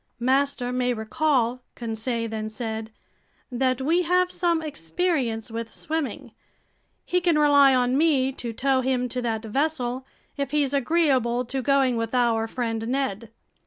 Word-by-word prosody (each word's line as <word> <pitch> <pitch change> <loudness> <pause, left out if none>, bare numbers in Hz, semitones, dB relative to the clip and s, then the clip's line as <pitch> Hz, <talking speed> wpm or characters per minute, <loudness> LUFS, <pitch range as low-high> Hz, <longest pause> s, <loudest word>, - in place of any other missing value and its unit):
"Master 260 0 +1
may 250 0 +1
recall," 245 +2 0
Conseil 230 0 -3
then 215 -1 -4
said, 220 -1 -5 0.6
"that 255 +1 0
we 330 +6 +2
have 360 +1 +2
some 340 -2 +1
experience 250 - -2
with 230 0 -5
swimming. 315 -3 -4 0.7
He 360 0 +1
can 340 -3 +2
rely 285 -2 +6
on 250 0 +2
me 280 -3 +3
to 240 -3 -6
tow 260 +3 +1
him 255 -1 0
to 250 +1 -3
that 225 -2 -2
vessel, 260 0 -1 0.3
if 280 -1 -2
he's 285 -1 +1
agreeable 265 -5 +2
to 265 +2 -3
going 270 -2 +2
with 230 +2 -2
our 230 -2 +2
friend 225 -2 -3
Ned." 235 -4 -2
255 Hz, 145 wpm, -25 LUFS, 230-285 Hz, 0.7 s, rely